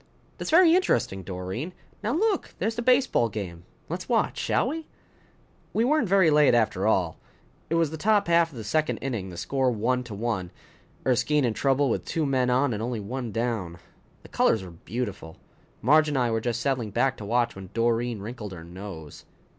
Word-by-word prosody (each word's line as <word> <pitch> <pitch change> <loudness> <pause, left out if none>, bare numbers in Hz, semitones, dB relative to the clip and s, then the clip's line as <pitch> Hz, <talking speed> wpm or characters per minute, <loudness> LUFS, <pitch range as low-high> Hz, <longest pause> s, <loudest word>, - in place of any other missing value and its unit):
"That's - - -4
very 335 0 +6
interesting, 95 - +1
Doreen. 95 - -5 0.3
Now 220 - -1
look, 410 +4 0
there's 220 +4 -1
the 235 - -3
baseball 250 - +3
game. 90 -5 -6 0.2
Let's 180 +7 -5
watch, 230 -3 +1
shall 250 - +1
we?" 320 +2 -5 0.9
We 225 - +2
weren't 290 -6 +2
very 190 -4 +5
late 150 -4 +5
after 110 -4 +1
all. 90 -6 +1 0.5
It 165 - +1
was 165 -3 +2
the 160 - -5
top 205 +2 +2
half 170 -1 +4
of 140 - -13
the 110 - -5
second 155 +8 0
inning, 115 -9 -4
the 90 - -9
score 135 +4 0
one 125 +2 0
to 110 -4 -7
one, 105 -4 -2 0.6
Erskine 135 +3 +2
in 115 - 0
trouble 135 +3 +2
with 120 - -1
two 160 -2 -1
men 130 -2 +1
on 130 +1 +2
and 105 - -3
only 120 0 -2
one 120 +3 -5
down. 110 -7 -2 0.5
The - - -14
colors 110 -4 +2
were 90 - -9
beautiful. 100 -2 -6 0.5
Marge 155 +6 +5
and 145 -2 -1
I 120 -2 +1
were 115 0 0
just 120 0 -2
settling 125 -4 -1
back 130 +6 +1
to 105 - -7
watch 120 +2 +1
when 95 -1 -9
Doreen 115 -1 0
wrinkled 105 -2 -7
her 85 -2 -9
nose. 85 -3 -9
125 Hz, 195 wpm, -26 LUFS, 105-155 Hz, 0.9 s, very